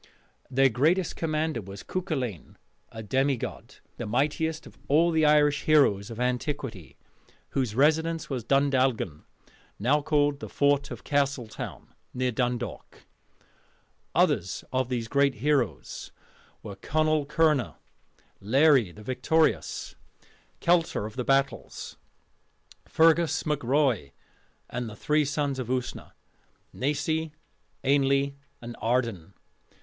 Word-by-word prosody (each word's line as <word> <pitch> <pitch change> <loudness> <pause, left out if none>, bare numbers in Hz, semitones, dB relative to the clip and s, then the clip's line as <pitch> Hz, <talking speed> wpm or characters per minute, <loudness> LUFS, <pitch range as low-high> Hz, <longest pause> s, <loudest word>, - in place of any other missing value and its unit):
Their 135 +1 +4
greatest 160 +10 +1
commander 155 -5 -1
was 100 0 -10
Cuculainn, 135 - -4 0.4
a 110 - -8
demigod, 130 +3 -2 0.2
the 115 - -5
mightiest 150 +7 -1
of - - -14
all 165 +4 +4
the 160 -1 +3
Irish 145 -1 +3
heroes 130 -10 +4
of 115 0 -8
antiquity, 125 - -3 0.5
whose 125 -6 -1
residence 160 +4 +2
was 130 -4 -3
Dundalgan, 130 - +1 0.5
now 135 +8 +2
called 145 -1 +1
the - - -7
Fort 140 0 +2
of 120 -3 -8
Castletown, 140 -5 -2 0.2
near 125 0 0
Dundalk. 120 0 -4 1.1
Others 90 +2 +1
of 130 -1 0
these 120 -3 -2
great 140 +1 +2
heroes 135 - -1 0.5
were - - -7
Conall 155 -1 0
Kernagh, 150 -3 +2 0.7
Laery 130 - +4
the 105 +5 -13
Victorious, 130 +7 0 0.7
Keltar 170 -10 +2
of 105 - -8
the 125 - -2
Battles, 135 +2 -1 0.9
Fergus 160 -2 +3
mac 150 -3 -1
Roy, 130 - +1 0.5
and 120 -2 -4
the 105 - -10
three 150 +6 +1
Sons 145 -1 -1
of 125 - -4
Usna 125 0 -4 0.6
Naisi, 150 +3 -1 0.5
Ainnle, 140 0 +2 0.3
and 120 0 -7
Ardan. 115 -8 -1
140 Hz, 115 wpm, -27 LUFS, 120-150 Hz, 1.1 s, Their